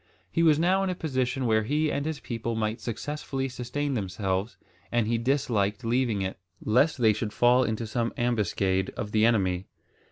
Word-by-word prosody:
He 165 Hz, -, +1 dB
was 160 Hz, -3 st, +5 dB
now 185 Hz, +4 st, +3 dB
in 195 Hz, -, 0 dB
a 180 Hz, -, -1 dB
position 130 Hz, -5 st, -1 dB
where 110 Hz, -2 st, +3 dB
he 150 Hz, +7 st, 0 dB
and 140 Hz, +2 st, -2 dB
his 160 Hz, -2 st, -3 dB
people 115 Hz, -1 st, -4 dB
might 110 Hz, +1 st, -2 dB
successfully 135 Hz, +3 st, -3 dB
sustain 135 Hz, +3 st, -3 dB
themselves, 95 Hz, -1 st, -2 dB, 0.3 s
and 120 Hz, -2 st, +2 dB
he 115 Hz, +1 st, 0 dB
disliked 120 Hz, -4 st, 0 dB
leaving 115 Hz, -4 st, +1 dB
it, 95 Hz, 0 st, -4 dB, 0.3 s
lest 135 Hz, +9 st, +3 dB
they 110 Hz, -4 st, +4 dB
should 105 Hz, 0 st, -4 dB
fall 125 Hz, +1 st, +4 dB
into 110 Hz, -1 st, -2 dB
some 115 Hz, +1 st, -1 dB
ambuscade 100 Hz, -5 st, 0 dB
of 105 Hz, -, -4 dB
the 110 Hz, +1 st, +4 dB
enemy. 95 Hz, -5 st, +1 dB
120 Hz, 180 wpm, -27 LUFS, 105-135 Hz, 0.3 s, was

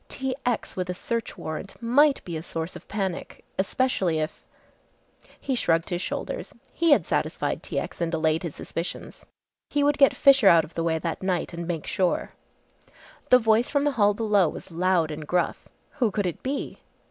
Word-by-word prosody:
T. 265 Hz, -1 st, -3 dB
X. 240 Hz, -3 st, -1 dB
with 180 Hz, -1 st, -3 dB
a 180 Hz, -, -2 dB
search 230 Hz, +2 st, -3 dB
warrant 170 Hz, +3 st, -6 dB
might 275 Hz, +5 st, +3 dB
be 170 Hz, -, -5 dB
a 155 Hz, -, -3 dB
source 165 Hz, 0 st, -4 dB
of -, -, -11 dB
panic 195 Hz, -4 st, -4 dB
especially 190 Hz, -5 st, +1 dB
if 155 Hz, +1 st, -3 dB, 1.0 s
he 270 Hz, -, -2 dB
shrugged 165 Hz, -7 st, +1 dB
his 175 Hz, 0 st, -1 dB
shoulders. -, -, -4 dB, 0.2 s
He 335 Hz, -, +1 dB
had 285 Hz, -, +5 dB
satisfied -, -, -1 dB
T. -, -, -5 dB
X. -, -, -4 dB
and 165 Hz, -1 st, 0 dB
allayed 160 Hz, -1 st, +1 dB
his 170 Hz, -5 st, -5 dB
suspicions. 170 Hz, +2 st, -6 dB, 0.4 s
He 290 Hz, -, +1 dB
would 290 Hz, 0 st, +2 dB
get 275 Hz, -, +6 dB
Fisher 275 Hz, -6 st, +6 dB
out 165 Hz, -3 st, +7 dB
of 160 Hz, -, -17 dB
the 165 Hz, -, -2 dB
way 165 Hz, -1 st, +1 dB
that 165 Hz, 0 st, -3 dB
night 185 Hz, -2 st, -1 dB
and 170 Hz, 0 st, -5 dB
make 165 Hz, -3 st, -3 dB
sure. 185 Hz, -2 st, 0 dB, 1.0 s
The 250 Hz, -, +8 dB
voice 225 Hz, 0 st, +3 dB
from 285 Hz, -1 st, +1 dB
the 290 Hz, -, +2 dB
hall 205 Hz, -5 st, +3 dB
below 205 Hz, -6 st, +3 dB
was -, -, -9 dB
loud 170 Hz, -1 st, +1 dB
and 150 Hz, 0 st, -6 dB
gruff. 175 Hz, 0 st, -1 dB, 0.3 s
Who 240 Hz, -4 st, +3 dB
could 205 Hz, -1 st, -1 dB
it 175 Hz, -, -3 dB
be! 275 Hz, +2 st, -4 dB
185 Hz, 190 wpm, -26 LUFS, 165-240 Hz, 1.0 s, The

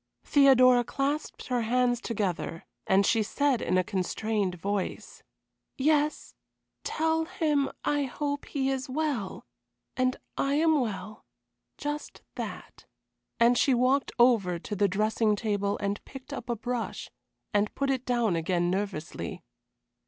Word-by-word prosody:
Theodora 255 Hz, -3 st, +6 dB
clasped 280 Hz, +5 st, -2 dB
her 250 Hz, -1 st, +1 dB
hands 245 Hz, +1 st, +1 dB
together, 190 Hz, -7 st, -3 dB, 0.2 s
and 195 Hz, +1 st, +4 dB
she 225 Hz, +2 st, +3 dB
said 265 Hz, +3 st, +1 dB
in 185 Hz, -, +1 dB
a 185 Hz, -, +3 dB
constrained 195 Hz, +1 st, -1 dB
voice: 200 Hz, +2 st, -4 dB, 0.6 s
"Yes. 300 Hz, +2 st, +1 dB, 0.5 s
Tell 320 Hz, 0 st, 0 dB
him 300 Hz, -5 st, 0 dB, 0.2 s
I 290 Hz, -1 st, +1 dB
hope 285 Hz, +2 st, -3 dB
he 270 Hz, -1 st, -1 dB
is 265 Hz, -1 st, -3 dB
well 270 Hz, -8 st, -2 dB, 0.5 s
and 255 Hz, 0 st, +1 dB, 0.2 s
I 275 Hz, +1 st, +1 dB
am 315 Hz, 0 st, +4 dB
well 210 Hz, -2 st, -5 dB, 0.5 s
just 295 Hz, +1 st, -5 dB
that," -, -, -7 dB, 0.5 s
and 235 Hz, +1 st, +5 dB
she 265 Hz, -, +4 dB
walked 255 Hz, +3 st, +2 dB
ever 220 Hz, -8 st, +4 dB
to 205 Hz, +5 st, -6 dB
the 200 Hz, +1 st, +3 dB
dressing 215 Hz, +2 st, +1 dB
table 205 Hz, -2 st, -1 dB
and 200 Hz, 0 st, -3 dB
picked 265 Hz, -1 st, -10 dB
up 240 Hz, -, -7 dB
a 235 Hz, -, +1 dB
brush, 240 Hz, +1 st, -4 dB, 0.4 s
and 205 Hz, 0 st, +1 dB
put 275 Hz, -1 st, 0 dB
it 260 Hz, -2 st, -1 dB
down 240 Hz, -7 st, +1 dB
again 175 Hz, +1 st, 0 dB
nervously. 190 Hz, -5 st, -4 dB
240 Hz, 135 wpm, -28 LUFS, 205-275 Hz, 0.6 s, Theodora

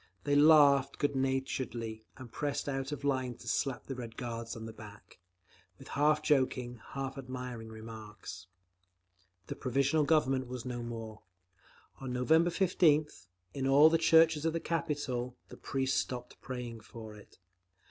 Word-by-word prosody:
They 145 Hz, -, 0 dB
laughed 145 Hz, -2 st, +6 dB
good 145 Hz, -1 st, 0 dB
naturedly 130 Hz, -4 st, -2 dB
and 130 Hz, -3 st, -10 dB
pressed 145 Hz, +2 st, -2 dB
out 135 Hz, 0 st, -2 dB
of 145 Hz, -1 st, -5 dB
line 130 Hz, -3 st, 0 dB
to 115 Hz, -, -14 dB
slap 120 Hz, +2 st, -1 dB
the 135 Hz, -, -5 dB
Red 120 Hz, -3 st, -8 dB
Guards 115 Hz, -1 st, -5 dB
on 110 Hz, -1 st, -7 dB
the 115 Hz, -, -7 dB
back, 105 Hz, -3 st, -13 dB, 0.6 s
with -, -, -13 dB
half 150 Hz, +1 st, +2 dB
joking, 125 Hz, -4 st, +1 dB
half 135 Hz, 0 st, -4 dB
admiring 125 Hz, -3 st, -6 dB
remarks…. 110 Hz, -4 st, -9 dB, 1.0 s
The -, -, -6 dB
Provisional 140 Hz, +4 st, +1 dB
Government 135 Hz, -4 st, +2 dB
was 125 Hz, -1 st, -6 dB
no 125 Hz, -1 st, -4 dB
more. 115 Hz, -2 st, -7 dB, 0.8 s
On 130 Hz, -2 st, -5 dB
November 160 Hz, +7 st, +3 dB
15th, 155 Hz, -, +2 dB, 0.3 s
in 135 Hz, -1 st, -2 dB
all 145 Hz, +4 st, +7 dB
the 165 Hz, -, +3 dB
churches 160 Hz, -2 st, +5 dB
of 165 Hz, -1 st, +1 dB
the 165 Hz, -, -1 dB
capital, 145 Hz, -7 st, -2 dB
the -, -, -11 dB
priests 135 Hz, -1 st, 0 dB
stopped 125 Hz, -1 st, -6 dB
praying 125 Hz, -3 st, -6 dB
for 110 Hz, 0 st, -10 dB
it. 105 Hz, -1 st, -16 dB
130 Hz, 150 wpm, -32 LUFS, 115-145 Hz, 1.0 s, all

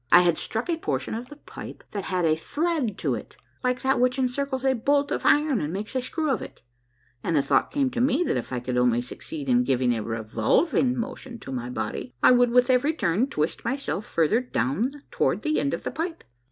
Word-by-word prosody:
I 175 Hz, -, +9 dB
had 175 Hz, -2 st, +2 dB
struck 225 Hz, +6 st, -2 dB
a 340 Hz, -2 st, 0 dB
portion 135 Hz, -, -2 dB
of 235 Hz, +3 st, -5 dB
the 295 Hz, -, -10 dB
pipe 295 Hz, -, -10 dB
that 200 Hz, -2 st, -4 dB
had 180 Hz, -2 st, 0 dB
a 155 Hz, -1 st, +4 dB
thread 290 Hz, -, -1 dB
to -, -, 0 dB
it, -, -, -7 dB, 0.3 s
like 250 Hz, +1 st, 0 dB
that 265 Hz, 0 st, +2 dB
which 250 Hz, +1 st, +2 dB
encircles 265 Hz, +1 st, -1 dB
a 265 Hz, -, +4 dB
bolt 280 Hz, +4 st, +1 dB
of -, -, 0 dB
iron 295 Hz, -5 st, +4 dB
and 150 Hz, -, -2 dB
makes 205 Hz, +7 st, -4 dB
a 255 Hz, -, +1 dB
screw 310 Hz, +4 st, -1 dB
of 260 Hz, -, 0 dB
it, -, -, -10 dB, 0.6 s
and 170 Hz, -, 0 dB
the 140 Hz, -, +3 dB
thought 140 Hz, -, +2 dB
came 275 Hz, -3 st, 0 dB
to 245 Hz, -1 st, -1 dB
me 275 Hz, +6 st, +3 dB
that -, -, 0 dB
if 125 Hz, -, -3 dB
I 125 Hz, -, -1 dB
could 125 Hz, 0 st, -1 dB
only 120 Hz, -1 st, +3 dB
succeed 280 Hz, -, -6 dB
in 245 Hz, -1 st, +4 dB
giving 125 Hz, -, +2 dB
a 115 Hz, -, -2 dB
revolving 115 Hz, -, +1 dB
motion 250 Hz, 0 st, -5 dB
to -, -, -8 dB
my 125 Hz, -2 st, -4 dB
body, 125 Hz, 0 st, -4 dB
I -, -, +8 dB
would 245 Hz, -1 st, +5 dB
with 250 Hz, +2 st, +4 dB
every 265 Hz, +5 st, +3 dB
turn 205 Hz, -, +1 dB
twist 155 Hz, -, -2 dB
myself 265 Hz, -6 st, -2 dB
farther 170 Hz, +9 st, +2 dB
down 245 Hz, -, -1 dB
toward -, -, 0 dB
the 310 Hz, -1 st, +1 dB
end 280 Hz, -, 0 dB
of -, -, -3 dB
the -, -, -3 dB
pipe. 330 Hz, +1 st, -4 dB
245 Hz, 230 wpm, -25 LUFS, -, 0.6 s, I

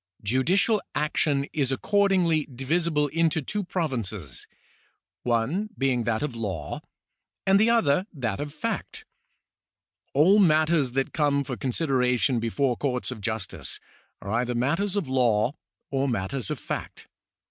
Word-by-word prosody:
Judicial 175 Hz, -, +2 dB
action 145 Hz, -2 st, +1 dB
is 135 Hz, -4 st, +1 dB
accordingly 180 Hz, -1 st, +2 dB
divisible 150 Hz, +3 st, 0 dB
into 165 Hz, +1 st, +1 dB
two 205 Hz, +8 st, -3 dB
provinces; 115 Hz, -, -4 dB, 0.7 s
one 125 Hz, -, 0 dB
being 130 Hz, -3 st, +1 dB
that 115 Hz, +2 st, 0 dB
of 140 Hz, -5 st, -3 dB
law, 95 Hz, -10 st, -4 dB, 0.6 s
and 195 Hz, +1 st, +5 dB
the 220 Hz, +2 st, +4 dB
other 185 Hz, -6 st, +3 dB
that 115 Hz, -, -3 dB
of 145 Hz, 0 st, -4 dB
fact. 225 Hz, +6 st, -4 dB, 1.1 s
All 180 Hz, +9 st, +6 dB
matters 155 Hz, -6 st, +3 dB
that 135 Hz, 0 st, -1 dB
come 145 Hz, -2 st, +2 dB
for 130 Hz, -2 st, -4 dB
consideration 125 Hz, -2 st, +1 dB
before 120 Hz, +3 st, 0 dB
coiu'ts 125 Hz, -1 st, -2 dB
of 115 Hz, -4 st, -7 dB
justice 110 Hz, -2 st, -3 dB, 0.4 s
are 100 Hz, -, -5 dB
either 120 Hz, +2 st, 0 dB
matters 165 Hz, +12 st, 0 dB
of 200 Hz, -8 st, -1 dB
law 120 Hz, -2 st, +2 dB, 0.4 s
or 135 Hz, 0 st, +1 dB
matters 115 Hz, +1 st, -2 dB
of -, -, -2 dB
fact. -, -, -6 dB
140 Hz, 130 wpm, -26 LUFS, 120-165 Hz, 1.1 s, All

